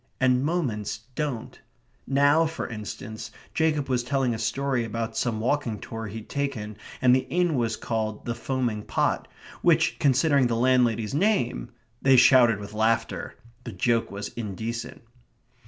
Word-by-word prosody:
And 130 0 +3
moments 115 - -2
don't. 130 -4 -4 0.5
Now, 145 +4 +4
for 165 - -4
instance, 110 0 -7 0.2
Jacob 155 -3 +1
was 125 -2 +1
telling 130 0 0
a 110 - -4
story 130 +2 0
about 115 0 -4
some 115 -3 -1
walking 120 -1 0
tour 115 +2 -6
he'd 110 +1 -8
taken, 135 -7 -3 0.3
and 125 0 +6
the 130 0 -1
inn 175 -1 +1
was 115 -4 0
called 110 -2 -3
"The 120 - -1
Foaming 120 -2 -2
Pot," - - 0 0.3
which, - - +3
considering 140 0 +3
the 115 - 0
landlady's 120 -2 +2
name... 185 - +1 0.3
They 135 -1 +5
shouted 125 -3 +6
with 100 0 -8
laughter. 110 +1 0 0.3
The - - -7
joke 115 -1 +1
was 100 +1 -5
indecent. 115 +2 -5
120 Hz, 145 wpm, -26 LUFS, 110-135 Hz, 0.5 s, and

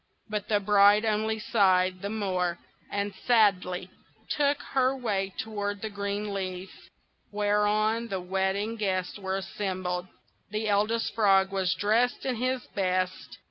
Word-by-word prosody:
But 210 -2 -3
the 210 -2 +3
bride 205 +1 +5
only 220 0 0
sighed 185 -4 +2
the 200 - -3
more, 185 -5 -1 0.3
and 200 0 -2
sadly 190 -6 +2 0.4
took 290 -1 +2
her 265 0 +2
way 200 -6 -1
toward 205 -2 -3
the 220 - -3
great 200 0 -3
leaf, 190 -2 -4 0.6
whereon 210 +2 +1
the 195 -4 -3
wedding 190 +4 -1
guests 190 -2 -2
were 190 -1 -2
assembled. 185 -1 -3 0.4
The 215 +1 -2
Eldest 210 +3 +1
Frog 195 -3 +4
was 185 -1 0
dressed 225 +5 +1
in 255 -3 -1
his 255 +1 -1
best. 185 -2 -1
205 Hz, 135 wpm, -28 LUFS, 190-215 Hz, 0.6 s, bride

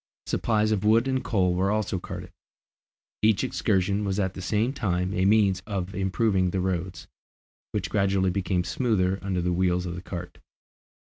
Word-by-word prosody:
Supplies 110 -1 +1
of 105 -2 0
wood 115 +4 +4
and 130 -1 0
coal 95 -7 +1
were 95 +2 +1
also 105 -3 0
carted. - - -8 0.9
Each 105 -2 +3
excursion 100 +2 0
was 100 0 -1
at 95 -2 0
the 95 - -7
same 110 +7 0
time 90 -6 -1
a 95 -2 +1
means 100 -2 +3
of 95 -3 -3
improving 95 -1 +1
the 95 - -1
roads, 90 -2 -2 0.7
which - - -3
gradually 95 -2 +2
became 95 -1 0
smoother 95 -4 0
under 95 -2 -1
the 90 0 +1
wheels 90 0 +1
of 85 - -4
the 90 - -6
cart. 90 -1 -7
95 Hz, 170 wpm, -26 LUFS, 90-105 Hz, 0.9 s, wood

